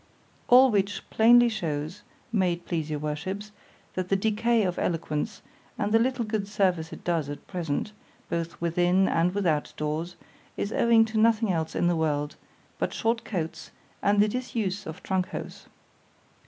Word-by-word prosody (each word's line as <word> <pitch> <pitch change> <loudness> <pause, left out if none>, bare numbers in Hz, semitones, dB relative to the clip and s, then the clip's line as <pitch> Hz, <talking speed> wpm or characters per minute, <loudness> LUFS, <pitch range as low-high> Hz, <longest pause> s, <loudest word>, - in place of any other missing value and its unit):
—All 255 +1 +8
which 200 -1 -1
plainly 240 +2 +6
shews, 170 -4 -3 0.3
may 190 -5 +2
it 170 0 -9
please 160 -3 -2
your 150 - -1
worships, 170 +8 -4 0.4
that 185 -1 -3
the 195 - +3
decay 220 +3 +2
of 180 -2 -1
eloquence, 165 +4 -2 0.3
and 205 - -1
the 225 - +5
little 250 0 0
good 210 -2 -2
service 185 -6 0
it - - -10
does 165 -5 0
at 145 - -7
present, 175 +2 -3 0.4
both 170 0 -3
within 175 +3 +2
and 175 +3 +1
without 165 -7 0
doors, 155 +3 -3 0.4
is 200 - -2
owing 230 -1 +5
to 220 0 -2
nothing 225 -1 +3
else 160 -2 -2
in - - +1
the 175 0 +3
world, 150 -2 -1 0.4
but - - -1
short 230 +1 0
coats, 165 -6 -4 0.3
and 205 0 +3
the 210 - +5
disuse 210 -4 -3
of 160 +2 -8
_trunk 185 -1 0
hose. - - -8
190 Hz, 165 wpm, -27 LUFS, 165-215 Hz, 0.4 s, All